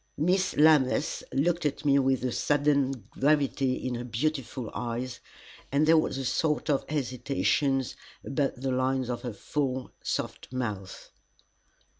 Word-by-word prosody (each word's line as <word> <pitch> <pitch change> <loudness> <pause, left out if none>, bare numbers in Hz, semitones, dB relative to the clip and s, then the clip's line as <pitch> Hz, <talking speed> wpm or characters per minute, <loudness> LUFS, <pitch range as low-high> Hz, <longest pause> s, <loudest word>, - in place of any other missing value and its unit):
Miss 185 +5 +1
Lammas 150 -4 +4
looked 170 +5 +1
at 145 0 -2
me 140 -1 +5
with 130 -2 +1
a 125 - 0
sudden 145 0 +2 0.2
gravity 140 -2 +2
in 130 -1 -3
her 120 0 -3
beautiful 125 0 -2
eyes, 120 +1 -4 0.5
and 140 +3 +3
there 160 +1 +6
was 155 -4 +2
a 135 - -3
sort 150 +4 +1
of 140 - -1
hesitation 135 0 0 0.4
about 135 0 0
the 130 +1 -3
lines 130 0 0
of 120 - -4
her 125 -3 -4
full, 130 +3 -2
soft - - -4
mouth. 105 -7 -5
135 Hz, 140 wpm, -28 LUFS, 125-150 Hz, 0.5 s, there